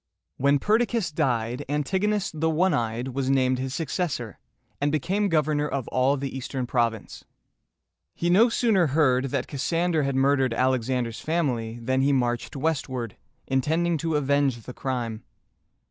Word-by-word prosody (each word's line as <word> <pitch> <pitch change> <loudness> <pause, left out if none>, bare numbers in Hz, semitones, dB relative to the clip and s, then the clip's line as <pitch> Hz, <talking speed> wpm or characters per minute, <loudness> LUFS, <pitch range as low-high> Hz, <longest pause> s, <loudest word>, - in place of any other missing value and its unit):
When 140 +1 +3
Perdiccas 220 - +1
died, 125 -2 -1
An 150 0 0
tig´o 190 +6 0
nus 205 -2 -1
("the 160 +1 0
one 170 +3 +2
eyed") 120 0 -1
was 130 0 -2
named 130 -1 +2
his 130 0 -3
successor, 145 - -3 0.4
and 145 0 +2
became 190 +8 0
governor 150 -2 +1
of 140 -4 -3
all 130 +3 +2
the 135 -1 -4
Eastern 130 0 -3
province. 115 -3 -2 0.9
He 170 - -2
no 205 +8 +5
sooner 220 -7 +2
heard 130 -4 +3
that 135 -1 -2
Cassander 165 +4 0
had 140 -1 -1
murdered 135 -2 +2
Alexander's 125 -2 0
family, 125 -9 -1
than 130 +3 0
he 140 +1 +3
marched 120 -1 -1
westward, 130 -6 -2 0.3
intending 160 +6 +1
to 165 0 -1
avenge 140 -4 +1
the 125 - -8
crime. 120 -5 -3
135 Hz, 150 wpm, -25 LUFS, 125-160 Hz, 0.9 s, no